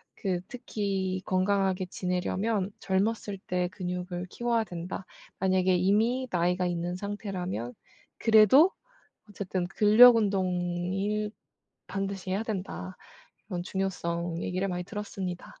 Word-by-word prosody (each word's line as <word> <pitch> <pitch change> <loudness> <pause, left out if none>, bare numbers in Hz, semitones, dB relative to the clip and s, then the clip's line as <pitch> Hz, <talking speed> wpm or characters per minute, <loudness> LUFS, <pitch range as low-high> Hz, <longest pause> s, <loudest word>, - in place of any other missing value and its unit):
그 185 -3 -1
특히 195 -6 -2
건강하게 190 0 +1
지내려면 190 +3 -1
"젊었을 200 +1 0
때 180 0 0
근육을 180 -1 -4
키워야 235 -1 +1
된다." 175 +1 -6 0.3
만약에 185 -1 +3
이미 220 +8 +2
나이가 180 +1 +1
있는 175 0 -2
상태라면 185 - -4 0.4
그래도 225 - +6 0.6
어쨌든 185 -3 -3
"근력 215 +5 +8
운동이 190 +1 0 0.6
반드시 195 -1 -3
해야 195 +3 0
된다." 190 -3 -5 0.5
이런 180 -4 -3
중요성 170 -3 -2
얘기를 185 +2 -1
많이 180 -1 -3
들었습니다. 195 -3 -6
190 Hz, 270 characters per minute, -28 LUFS, 180-205 Hz, 0.6 s, 근력